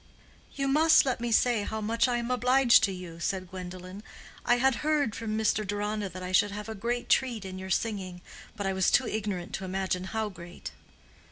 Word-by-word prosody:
"You 275 -1 -1
must 315 +3 +5
let 255 -3 -1
me 240 -1 -2
say 235 -1 +3
how 220 +2 -4
much 230 +4 +1
I 245 -1 0
am 240 +1 -3
obliged 250 -1 +5
to 200 - -3
you," 180 -3 -8
said 185 0 -3
Gwendolen. 185 +1 -8 0.4
"I 240 - +3
had 260 0 +2
heard 300 -7 +1
from 220 -2 -3
Mr. 220 0 +1
Deronda 205 0 -2
that 185 +1 -8
I 180 - -4
should 205 +3 +4
have 210 +1 -6
a 220 - -4
great 240 +4 -3
treat 240 -6 +1
in 185 0 -6
your 190 0 -7
singing, 190 -3 -2 0.3
but 205 -2 -4
I 195 - 0
was 190 -1 +2
too 265 - +4
ignorant 200 -5 -3
to 195 - -4
imagine 185 -1 -2
how 220 +2 -2
great." 175 -2 -9
210 Hz, 205 wpm, -28 LUFS, 185-240 Hz, 0.4 s, must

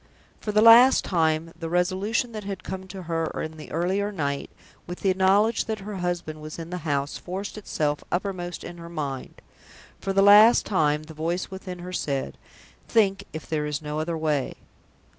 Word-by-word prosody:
For 210 - -3
the 210 +1 +4
last 240 +3 +8
time, 165 -2 +1
the 165 -1 -6
resolution 190 +7 0
that 215 -2 -6
had 195 -2 -6
come 190 0 -6
to 190 -1 -8
her 165 -1 -1 0.2
in 155 0 -7
the 155 - -10
earlier 190 +5 0
night, 140 -7 -3 0.4
with 175 +1 -7
the 190 -1 +3
knowledge 200 +4 +3
that 220 -2 -4
her 205 0 -6
husband 175 -4 -3
was 155 0 -8
in 165 0 -7
the 180 - -3
house, 140 0 -1
forced 190 +3 -5
itself 150 -8 -2
uppermost 175 -1 -3
in 175 - -8
her 170 0 -9
mind. 140 -6 -5 0.6
For 195 - -2
the 195 0 +4
last 210 +4 +8
time, 150 -6 +1
the 160 +1 -11
voice 170 +5 -2
within 190 -1 -7
her 180 - -7
said, 140 -6 -3 0.5
"Think 200 -4 +2
if 155 - -7
there 150 -2 -1
is 150 -1 -2
no 150 0 -4
other 165 +1 -2
way!" 150 -4 -1
175 Hz, 185 wpm, -25 LUFS, 155-195 Hz, 0.6 s, last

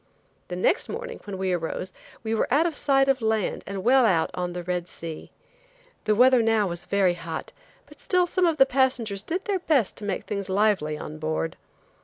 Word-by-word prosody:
The 180 - -5
next 265 - +1
morning 480 +1 -6
when 200 -2 -5
we 190 -1 -1
arose 175 +2 -3 0.3
we 220 0 -2
were 225 - 0
out 295 +5 +4
of 340 - 0
sight 270 -2 +2
of 270 -2 +2
land 220 -2 0
and 195 -1 -5
well 260 +3 +5
out 175 -8 +2
on 180 -1 -3
the 175 0 -5
Red 180 0 -2
Sea. 165 -3 -8 0.8
The 215 - +3
weather 250 +2 +6
now 225 -2 +2
was 175 -2 -4
very 195 -3 +2
hot, 165 -2 -6 0.3
but - - -17
still 360 -1 +2
some 355 0 +1
of 325 -2 +1
the 270 - +7
passengers 250 -7 +1
did 360 - -3
their 400 -3 0
best 295 - +1
to - - -10
make 195 -2 -2
things 200 -2 -4
lively 190 -6 +1
on 155 +1 -8
board. 155 +1 -2
210 Hz, 205 wpm, -25 LUFS, 180-270 Hz, 0.8 s, the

